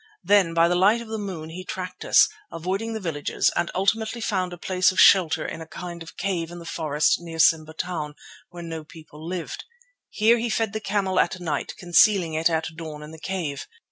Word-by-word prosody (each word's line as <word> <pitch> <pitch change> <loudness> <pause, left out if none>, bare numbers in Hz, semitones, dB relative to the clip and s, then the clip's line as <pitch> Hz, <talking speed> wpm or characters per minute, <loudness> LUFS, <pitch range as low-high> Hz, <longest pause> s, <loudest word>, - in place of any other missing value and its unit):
Then 195 -5 +3
by 165 0 +5
the 175 - +1
light 195 +6 +4
of 235 -1 -9
the 220 0 -3
moon 180 -6 -6
he 185 +3 -7
tracked 185 0 -6
us, - - +6 0.2
avoiding 195 +7 -3
the 220 - -3
villages, 160 -7 0
and 170 - 0
ultimately 220 +4 0
found 185 -5 -1
a 175 - -7
place 185 +2 +2
of 185 - -3
shelter 165 -5 +5
in 160 - -5
a 160 - -8
kind 175 0 -8
of 165 - -11
cave 175 -4 -2
in 175 - -9
the 170 - -10
forest 150 -3 +1
near 165 -1 -8
to 160 - +7
Simba 155 -1 +1
Town, 155 -3 -4 0.3
where 175 -1 -9
no 165 -1 -6
people 155 -1 -14
lived. 175 0 -5 0.5
Here 230 +2 +3
he 235 +1 -1
fed 220 -2 0
the 215 - -2
camel 195 -2 0
at 190 - +1
night, 155 -5 -3
concealing 180 -2 +4
it 160 +2 +2
at 160 -1 -1
dawn 155 -2 -7
in 150 - -10
the 160 - -11
cave. 165 -5 -4
175 Hz, 215 wpm, -24 LUFS, 160-195 Hz, 0.5 s, to